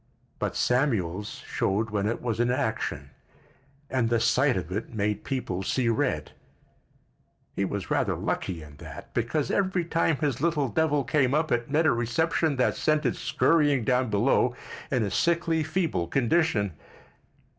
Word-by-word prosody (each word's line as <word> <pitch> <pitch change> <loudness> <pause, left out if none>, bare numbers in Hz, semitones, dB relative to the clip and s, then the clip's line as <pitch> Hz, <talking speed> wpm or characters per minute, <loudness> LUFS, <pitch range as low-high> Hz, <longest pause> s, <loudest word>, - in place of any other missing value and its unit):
But - - -2
Samuel's 105 - 0
showed 105 +3 -1
when 105 -1 0
it 115 - -3
was 115 -2 -2
in 120 0 +2
action, 110 - -2 0.8
and 125 -4 0
the 120 -1 +2
sight 125 +3 +3
of 90 -1 -5
it 105 +4 -4
made 105 -2 -1
people 125 -9 -3
see 120 +5 0
red. 115 - 0 1.2
He 100 - 0
was 95 -1 -4
rather - - +1
lucky 85 -4 -3
in 75 -1 -13
that, 80 +4 -10
because 120 +5 -1
every 185 -3 +1
time 165 -1 +1
his 135 -4 -1
little 150 -5 +1
devil 150 +3 +1
came 130 +2 +2
up 155 +1 0
it 120 +1 0
met 155 +3 +2
a 155 - +5
reception 150 +6 +1
that 130 - +1
sent 155 -1 +1
it 125 - +1
scurrying 145 -6 +2
down 125 +1 +1
below 120 +3 +2 0.3
in 130 -6 +1
a 100 - -2
sickly, 170 +3 +1
feeble 155 - -1
condition. 120 - +1
125 Hz, 155 wpm, -27 LUFS, 105-150 Hz, 1.2 s, a